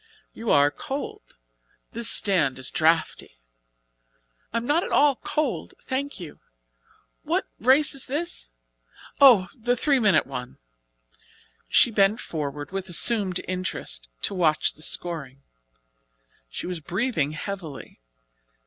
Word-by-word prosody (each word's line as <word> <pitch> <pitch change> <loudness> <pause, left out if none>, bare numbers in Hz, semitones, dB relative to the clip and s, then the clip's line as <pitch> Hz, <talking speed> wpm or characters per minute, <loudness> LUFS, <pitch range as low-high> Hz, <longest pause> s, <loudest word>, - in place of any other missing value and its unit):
"You 225 -1 -6
are 145 0 +4
cold! 275 - -7 0.5
This 230 0 +2
stand 165 -10 +4
is 130 0 -3
draughty." 160 - 0 1.1
"I 230 - -2
am 230 - -3
not 310 +6 +1
at - - -5
all 285 -3 +4
cold, 305 0 -3
thank 280 0 -4
you. 170 -5 -10 0.8
What - - -1
race 265 +6 +4
is 275 - -2
this? 305 - -3 0.7
oh! 230 -10 +7
the 245 +1 -1
three 275 +1 +2
minute 210 -5 +3
one." 125 -2 -7 1.1
She 240 - +5
bent 205 +1 +2
forward 145 -1 -5
with 190 -1 -5
assumed 190 0 +2
interest 180 - -4
to - - +1
watch 165 -5 +1
the 155 - -14
scoring. 150 -5 -3 1.1
She - - -7
was 180 -2 -4
breathing 170 - -2
heavily. 160 - -7
190 Hz, 120 wpm, -24 LUFS, 155-245 Hz, 1.1 s, oh